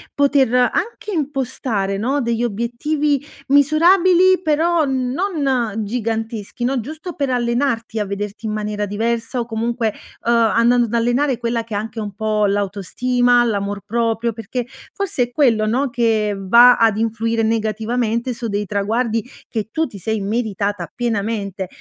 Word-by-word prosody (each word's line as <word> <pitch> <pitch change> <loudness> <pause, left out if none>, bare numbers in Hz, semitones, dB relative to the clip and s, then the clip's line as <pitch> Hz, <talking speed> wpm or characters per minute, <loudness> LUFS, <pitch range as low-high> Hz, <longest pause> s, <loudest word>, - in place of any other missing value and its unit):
poter 280 -3 +3
anche 345 - 0
impostare, 260 - -2
no, 265 +7 0
degli 235 -1 -1
obiettivi 255 +6 -1 0.3
misurabili, 350 +6 +5
però 325 0 +2
non 265 - -1
giganteschi, 225 0 -3
no. 260 +1 +1
Giusto 315 - -7
per 280 -2 -1
allenarti, 235 -2 0
a 210 - 0
vederti 200 +2 -5
in 210 - -2
maniera 210 -1 -2
diversa, 225 +4 -2
o 235 - -1
comunque, 230 -1 -1 0.3
uhm, 235 - +3
andando 235 +1 +3
ad 225 - -8
allenare 245 +3 +1
quella 230 -1 -1
che 225 - -9
è - - +1
anche 220 +2 -5
un 205 -2 -5
po' 215 0 0
l'autostima, 240 +5 +1
l'amor 200 -3 -2
proprio, 230 0 0
perché 230 +3 -4 0.3
forse 390 -10 -1
è 240 - -5
quello 235 -6 +3
no, 260 +5 +1
che 225 -3 +1
va 235 +6 +6
ad 225 -2 +3
influire 225 0 0
negativamente 225 +2 -1
su 235 0 -5
dei 205 -1 -2
traguardi 220 +4 0 0.3
che 215 -4 -3
tu 320 +6 0
ti 205 - -11
sei 220 +3 -2
meritata 205 -4 -2
pienamente. 205 -4 -2
230 Hz, 145 wpm, -19 LUFS, 215-255 Hz, 0.3 s, va